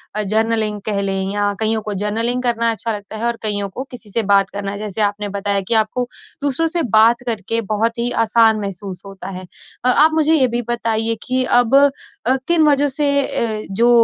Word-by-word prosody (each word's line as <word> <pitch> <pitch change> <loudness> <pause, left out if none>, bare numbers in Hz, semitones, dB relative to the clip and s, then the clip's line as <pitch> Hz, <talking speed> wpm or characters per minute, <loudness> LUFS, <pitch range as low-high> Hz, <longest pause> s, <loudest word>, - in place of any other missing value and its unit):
अ, 215 - +1
journaling 215 0 0
कह 205 -2 -1
लें 195 0 -2
या 205 0 0
कईयों 220 0 +2
को 210 0 -5
जर्नलिंग 230 +4 0
करना 230 -1 +2
अच्छा 225 +1 -4
लगता 205 +1 -9
है 230 - -3
और 235 -1 -1
कइयों 205 -2 -1
को 250 +7 -6
किसी 235 -4 -11
से 230 +1 0
बात 195 -1 +3
करना 200 0 -5
है 200 - -6
जैसे 210 0 -4
आपने 205 0 -1
बताया 200 0 -1
कि 235 - +2
आपको 245 +3 -4 0.4
दूसरों 290 +4 +1
से 335 0 -1
बात 230 +3 +5
करके 225 0 0
बहुत 230 +2 -1
ही 240 - 0 0.2
आसान 220 0 +3
महसूस 195 -2 -7
होता 195 0 -9
है। 185 -1 -8 0.4
अ, - - +4
आप 305 +5 +6
मुझे 315 0 +2
ये 275 -5 +4
भी 240 0 -2
बताइए 230 -1 +1
कि 255 0 +1 0.2
अब 245 +2 +2
अ, 275 -2 +1
किन 340 -2 +3
वज़ह 290 0 +3
से 290 +2 -1 0.2
अ, 220 -4 -1
जो 230 +5 +2
225 Hz, 210 wpm, -18 LUFS, 205-245 Hz, 0.4 s, आप